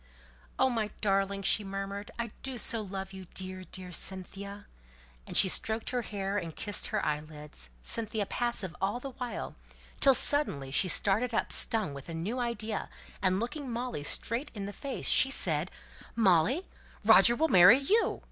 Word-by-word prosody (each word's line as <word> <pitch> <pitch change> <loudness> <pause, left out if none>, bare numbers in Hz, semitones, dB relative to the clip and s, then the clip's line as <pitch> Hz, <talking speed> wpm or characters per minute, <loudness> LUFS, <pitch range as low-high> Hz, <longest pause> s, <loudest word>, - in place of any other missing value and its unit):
"Oh, 260 0 +2
my 220 -3 -2
darling!" 195 -1 -1
she 205 +2 +1
murmured. 195 +1 -6
"I 235 -2 -4
do 265 -2 -5
so 230 0 0
love 195 -1 -7
you, 190 -1 -10
dear, 185 0 -6
dear 185 -1 -9
Cynthia!" 195 +3 -5 0.6
and - - +1
she - - +8
stroked 220 +4 +1
her 250 -1 -1
hair, 200 -2 -4
and 165 -4 -8
kissed 205 0 -2
her 215 -1 -2
eyelids; 150 - -6
Cynthia 220 - -2
passive 205 -6 -3
all 200 +5 -1
the 270 +1 -8
while, 250 -1 -6 0.5
till 270 -2 +5
suddenly 150 - +7
she 185 - +2
started 220 +6 +2
up - - -1
stung 215 -10 +2
with 140 +3 -11
a 165 - -6
new 205 +10 -4
idea, 235 -3 -4 0.3
and 185 0 +1
looking 270 +4 -5
Molly 240 -9 -5
straight 235 - -1
in 200 -2 -5
the 205 - -7
face, 275 +3 -2
she 265 - +5
said, 165 - 0 0.5
"Molly, 225 - +2 0.4
Roger 235 - +6
will 320 +5 +1
marry 185 +6 +7
you! 400 +12 0
205 Hz, 165 wpm, -29 LUFS, 185-235 Hz, 0.6 s, she